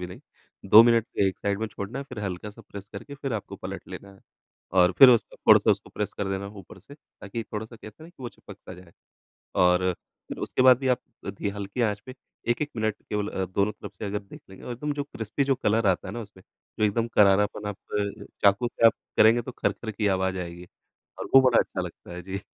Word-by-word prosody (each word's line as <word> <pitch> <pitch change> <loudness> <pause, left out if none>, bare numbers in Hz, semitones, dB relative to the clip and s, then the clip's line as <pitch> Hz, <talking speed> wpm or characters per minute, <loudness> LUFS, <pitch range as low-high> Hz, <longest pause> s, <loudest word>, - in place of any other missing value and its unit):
भी 90 - -4
नहीं। 90 - -11 0.5
2 110 - +11
मिनट 115 -1 +3
एक 95 -1 +1
साइड 100 -1 -1
में 110 - -1
छोड़ना 105 +4 -6
है, 140 - -5
फिर 125 - -8
हल्का 95 +2 -5
सा 115 +3 -15
प्रेस 100 0 -9
करके 120 +8 -8
फिर 135 -1 -5
आपको 110 -3 -5
पलट - - -7
लेना 100 - -9
है। 95 - -20 0.5
और 90 0 +5
फिर 135 - +11
उसको 120 -2 +1
थोड़ा-सा - - +5
उसको - - -1
प्रेस - - -3
कर 100 -1 -2
देना 95 0 -3
है 100 - -7
ऊपर 95 0 -13
से 140 +10 -14
ताकि 115 -6 -8
थोड़ा-सा 110 +2 -7
कहते 110 +5 -13
हैं 160 - -10
ना - - -14
कि 175 -6 -16
वो 120 - -4
चिपक - - -14
सा 95 - -11
जाए 90 -2 -16 0.7
और 90 0 +4 0.4
फिर - - -7
उसके - - 0
बाद 130 -1 +7
भी 135 - -2
आप 125 - +2 0.3
धी 100 +1 -3
हल्की 100 +3 -5
आँच 105 -2 0
पे 130 - -9 0.4
1-1 145 +5 0
मिनट 110 -2 -1
केवल 105 -1 -2
अ, 95 - -2
दोनों 100 +3 0
तरफ 105 -1 -10
से - - -7
अगर 105 0 -2
देख 100 - -13
लेंगे 95 - -13
और 125 - -5
एकदम 145 +5 -3
जो 145 - -3
क्रिस्पी 115 0 -3
जो 135 0 +2
कलर 115 -3 +1
आता 95 -2 +1
है - - -5
ना 120 - -4
उसमें, 100 -3 -12 0.4
जो 110 - +2
एकदम 115 +3 +1
करारापन 105 +1 +3
आप 105 - -5 0.7
चाकू 100 +4 +4
से 115 -1 +3
आप 115 - +6 0.2
करेंगे 115 +2 +5
तो 130 - -7
खर-खर 115 -1 -2
की 105 0 -2
आवाज़ 95 0 -1
आएगी, 85 0 -7 0.5
और - - -5
वो 135 - +10
बड़ा 120 - +4
अच्छा - - -2
लगता 85 - -9
है, 90 - -7
जी। 95 +2 -5
105 Hz, 240 wpm, -26 LUFS, 95-120 Hz, 0.7 s, 2